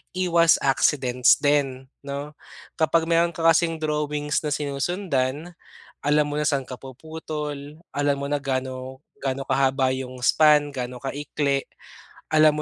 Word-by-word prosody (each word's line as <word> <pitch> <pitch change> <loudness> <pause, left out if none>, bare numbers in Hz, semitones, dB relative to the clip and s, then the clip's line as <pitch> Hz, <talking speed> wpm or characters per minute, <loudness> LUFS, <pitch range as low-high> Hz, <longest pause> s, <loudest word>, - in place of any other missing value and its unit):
iwas 170 -3 +4
accidents 130 -2 +3
din 135 -3 0 0.2
no. 140 +2 -6 0.4
Kapag 160 +1 +2
meron 170 0 +3
ka 165 -1 -4
kasing 165 0 +3
drawings 150 0 -1
na 150 - -2
sinusundan. 150 +1 -2 0.5
Alam 150 +1 +3
mo 145 - -3
na 150 - 0
saan 140 -2 +1
ka 125 - -7
puputol, 150 +1 -7
alam 145 0 0
mo - - -2
na 145 - +1
gaano 130 -1 -4 0.2
gaano 135 0 -2
kahaba 135 -1 +2
yung 130 -1 -5
span, 150 +2 +4
gaano 125 -2 -6
kaikli. 140 0 -2 0.7
Alam 155 0 +6
145 Hz, 135 wpm, -24 LUFS, 135-155 Hz, 0.7 s, Alam